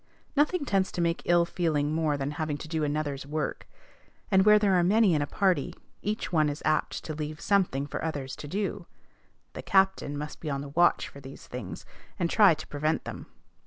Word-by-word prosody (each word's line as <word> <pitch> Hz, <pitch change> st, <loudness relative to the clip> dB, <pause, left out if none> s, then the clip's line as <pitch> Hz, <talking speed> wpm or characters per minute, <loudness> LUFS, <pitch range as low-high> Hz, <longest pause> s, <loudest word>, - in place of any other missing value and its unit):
Nothing 300 Hz, +2 st, +2 dB
tends 195 Hz, -6 st, +1 dB
to -, -, -4 dB
make 170 Hz, 0 st, 0 dB
ill 175 Hz, 0 st, +4 dB
feeling 155 Hz, -4 st, 0 dB
more 155 Hz, -2 st, +1 dB
than 140 Hz, +1 st, -2 dB
having 150 Hz, -1 st, -3 dB
to 155 Hz, -, -8 dB
do 160 Hz, -1 st, -1 dB
another's 145 Hz, -2 st, -2 dB
work; 150 Hz, 0 st, -3 dB, 0.6 s
and, 190 Hz, 0 st, +5 dB
where 210 Hz, +1 st, +7 dB
there 205 Hz, -2 st, +2 dB
are 180 Hz, -, +4 dB
many 205 Hz, +1 st, +4 dB
in 150 Hz, -, +2 dB
a 145 Hz, -, -1 dB
party, 190 Hz, +1 st, +1 dB, 0.3 s
each 210 Hz, -3 st, -3 dB
one 155 Hz, -2 st, +3 dB
is 145 Hz, +1 st, -6 dB
apt 155 Hz, -, 0 dB
to 155 Hz, -, -5 dB
leave 150 Hz, 0 st, -5 dB
something 180 Hz, -9 st, +1 dB
for 145 Hz, -, -5 dB
others 145 Hz, -5 st, -3 dB
to 145 Hz, -, -8 dB
do. 195 Hz, +1 st, -3 dB, 0.7 s
The -, -, -6 dB
captain 190 Hz, -7 st, +2 dB
must 150 Hz, +1 st, -6 dB
be 155 Hz, -, -5 dB
on 140 Hz, -1 st, -2 dB
the 140 Hz, -, -7 dB
watch 175 Hz, +4 st, +3 dB
for 140 Hz, -, -12 dB
these 135 Hz, 0 st, -11 dB
things, 120 Hz, -7 st, -7 dB, 0.3 s
and 170 Hz, -2 st, -1 dB
try 205 Hz, -7 st, +6 dB
to 155 Hz, -, -9 dB
prevent 155 Hz, +2 st, -1 dB
them. -, -, -7 dB
155 Hz, 205 wpm, -28 LUFS, 145-190 Hz, 0.7 s, where